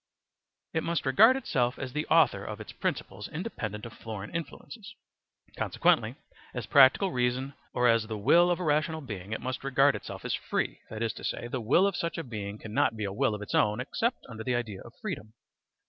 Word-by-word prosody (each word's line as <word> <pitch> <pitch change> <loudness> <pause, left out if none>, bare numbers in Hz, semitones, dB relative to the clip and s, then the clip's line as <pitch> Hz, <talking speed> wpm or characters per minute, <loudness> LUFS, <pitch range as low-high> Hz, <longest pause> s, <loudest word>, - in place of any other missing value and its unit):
It 160 - +1
must 170 -2 -1
regard 220 - +6
itself 125 - 0
as 130 -2 -5
the 150 0 -2
author - - +4
of - - -6
its - - -8
principles - - -3
independent 105 +2 -5
of 115 - -8
foreign 105 -2 -7
influences. 205 +5 -7 0.6
Consequently - - +2 0.4
as - - -3
practical 140 +7 +6
reason 125 +2 0 0.2
or 125 0 +3
as 115 -2 +3
the 110 -1 -4
will 170 +12 +5
of 175 - +1
a - - -3
rational 155 +1 +1
being 105 -7 -7
it 110 - -3
must 130 +1 -4
regard 135 +1 +4
itself - - -7
as - - -1
free, - - -2
that 110 +1 -4
is 115 - -1
to - - -11
say, 120 - -3
the 120 +1 -3
will 135 - +4
of 200 -2 +1
such 170 -1 -2
a 165 - -3
being 105 -5 -6
cannot 110 +1 0
be 110 - -3
a 100 -1 -2
will 105 +1 +1
of 105 - -6
its - - -7
own 105 0 +3
except - - -2
under 110 0 -7
the 125 +1 0
idea 110 -5 -3
of 120 - -12
freedom. 135 - -5
125 Hz, 210 wpm, -29 LUFS, 110-160 Hz, 0.6 s, regard